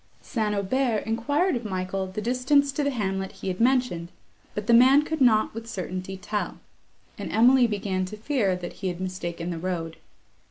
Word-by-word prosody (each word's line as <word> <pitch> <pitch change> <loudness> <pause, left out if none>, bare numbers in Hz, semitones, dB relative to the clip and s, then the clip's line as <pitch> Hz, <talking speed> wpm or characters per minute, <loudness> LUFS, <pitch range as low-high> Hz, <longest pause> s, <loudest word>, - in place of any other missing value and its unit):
St. 215 -5 -1
Aubert 220 +2 0
enquired 285 - +1
of 240 - -3
Michael 190 -1 -3
the 190 +3 -5
distance 260 +4 +2
to 290 +2 -1
the 285 - +1
hamlet 195 -6 -2
he - - -5
had 180 - -4
mentioned, 245 -9 +1 0.5
but 210 - -3
the 235 - +3
man 260 +5 +7
could 315 -1 -4
not 220 -4 +4
with 225 +1 -7
certainty 185 -2 -5
tell; 205 +3 -3 0.6
and - - -5
Emily 245 +2 +5
began 200 -3 -2
to 210 +3 -8
fear 220 -5 0
that 175 -1 -6
he 190 - -1
had 175 -1 -3
mistaken 180 -2 -4
the 165 - -4
road. 165 -2 -3
210 Hz, 185 wpm, -26 LUFS, 185-250 Hz, 0.6 s, man